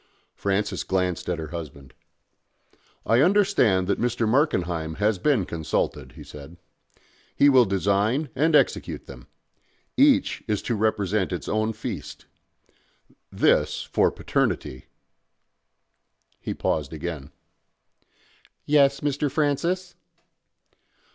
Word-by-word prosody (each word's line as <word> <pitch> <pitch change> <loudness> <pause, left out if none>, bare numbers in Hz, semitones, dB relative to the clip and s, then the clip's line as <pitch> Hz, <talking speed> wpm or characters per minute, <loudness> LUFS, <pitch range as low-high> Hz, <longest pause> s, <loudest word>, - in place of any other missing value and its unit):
Francis 100 +1 -1
glanced 90 -3 -1
at 90 - -1
her 80 -2 -6
husband. 75 -5 -9 1.1
"I 115 +3 +3
understand 175 - +3
that 100 - -1
Mr. 120 -1 0
Markenheim 90 - 0
has 105 +2 0
been 130 -8 +2
consulted," 80 -3 -3
he - - -11
said. 75 +4 -12 0.8
"He 145 - +5
will 130 -3 +6
design 100 - 0
and 155 +4 +2
execute - - +1
them. - - -12 0.7
Each 280 0 +3
is 105 -2 -1
to 120 - -2
represent 105 -2 0
its 90 - -5
own 110 +1 0
feast. - - -7 1.1
This - - +2
for - - +2
Paternity 65 - -2 0.8
" - - -47
He - - -4
paused 75 -2 -2
again. 75 -3 -6 1.4
"Yes, 140 -2 +3
Mr. 145 0 -1
Francis?" 170 +6 -1
105 Hz, 110 wpm, -24 LUFS, 90-140 Hz, 1.4 s, will